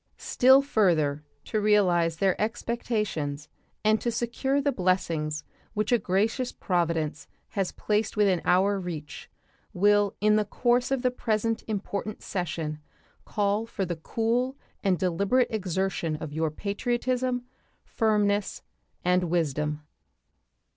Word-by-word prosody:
Still 265 +2 +5
further 160 - +2 0.2
to 215 - -1
realize 180 -6 +3
their 190 +1 +3
expectations 210 -10 -2 0.4
and 215 0 +4
to 240 - 0
secure 240 +4 0
the 285 0 +1
blessings 165 - 0 0.3
which 210 +2 0
a 240 - +4
gracious 215 +7 0
Providence 165 -4 -1 0.2
has 195 -3 -1
placed 215 +1 -1
within 195 -5 +3
our 195 +3 +3
reach 165 -5 -7 0.4
will 205 +1 +3
in 210 +1 +4
the 215 - +3
course 245 +4 +1
of 270 -2 -1
the 250 - +3
present 225 -2 -1
important 210 0 -4
session 155 -4 -3 0.5
call 205 +1 0
for 195 -4 -3
the 175 -1 -3
cool 235 +9 -1 0.3
and 190 -3 +2
deliberate 200 +8 +1
exertion 190 -5 -1
of 150 -1 -6
your 160 +1 0
patriotism, 245 - -1 0.4
firmness, 210 -2 0 0.4
and 180 0 +3
wisdom. 150 -3 -1
200 Hz, 120 wpm, -27 LUFS, 170-225 Hz, 0.5 s, Still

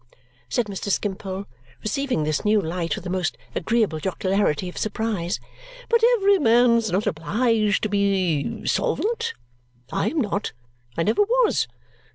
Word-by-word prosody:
said 245 - +1
Mr. 200 0 -5
Skimpole, 195 -1 -2 0.4
receiving 250 - -1
this 155 -1 -1
new 210 0 +4
light 165 -3 -2
with - - -8
a - - -3
most 185 -3 -1 0.2
agreeable 210 -4 +1
jocularity 190 -1 0
of 180 - -8
surprise. 210 -4 -2 0.5
"But 465 -1 +4 0.2
every 400 -1 +4
man's 235 -3 +4
not 195 +4 +1
obliged 210 +4 +1
to 215 - 0
be 195 -7 0
solvent? 460 +3 0 0.6
I - - 0
am 320 - -1
not. 205 - -1 0.4
I 165 - +2
never 220 - +2
was. 470 +3 +2
205 Hz, 140 wpm, -23 LUFS, 185-235 Hz, 0.6 s, new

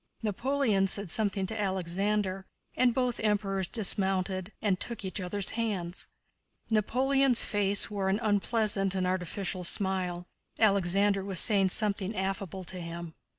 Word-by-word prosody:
Napoleon 220 -2 +1
said 200 -2 -3
something 200 -2 0
to 220 +3 -4
Alexander, 190 +1 -1 0.3
and 255 -1 +3
both 250 0 -1
Emperors 195 -3 0
dismounted 190 -2 +1
and 195 -4 0
took 230 -4 -3
each 190 +1 -3
other's 185 +1 -3
hands. 200 -6 -3 0.6
Napoleon's 260 +4 +3
face 205 -1 +3
wore 195 -2 -1
an 195 +2 +1
unpleasant 205 -2 +1
and 185 -1 0
artificial 185 +1 -2
smile. 180 -1 0 0.3
Alexander 200 -1 +2
was 190 -3 +2
saying 195 -3 +4
something 205 0 0
affable 190 -1 -3
to 185 +1 -5
him. 170 -1 -7
195 Hz, 130 wpm, -29 LUFS, 185-215 Hz, 0.6 s, saying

